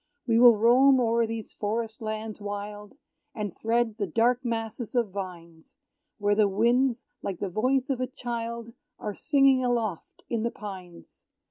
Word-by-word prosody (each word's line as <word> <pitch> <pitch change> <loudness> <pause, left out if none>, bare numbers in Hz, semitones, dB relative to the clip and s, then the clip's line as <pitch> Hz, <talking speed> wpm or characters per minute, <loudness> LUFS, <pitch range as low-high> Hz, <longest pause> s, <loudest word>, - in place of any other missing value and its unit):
We 230 -2 +3
will 240 -2 +8
roam 255 +5 +5
o'er 230 -1 +2
these 225 -1 -6
forest 220 +2 -3
lands 215 -1 -5
wild, 205 +2 -6 0.4
And 210 -5 -4
thread 230 0 0
the 200 - 0
dark 235 +8 +2
masses 230 0 -4
of 235 -5 +1
vines, 170 -4 -8 0.4
Where 205 -2 +2
the 210 0 +4
winds, 235 +5 +2 0.2
like 195 -3 -4
the 195 - -3
voice 255 +7 +1
of 255 -1 -2
a 255 - 0
child, 235 -2 -5 0.2
Are 210 - -4
singing 275 +1 +3
aloft 230 -8 -2
in 230 -2 -1
the 235 - 0
pines. 185 -6 -10
225 Hz, 155 wpm, -27 LUFS, 205-240 Hz, 0.4 s, will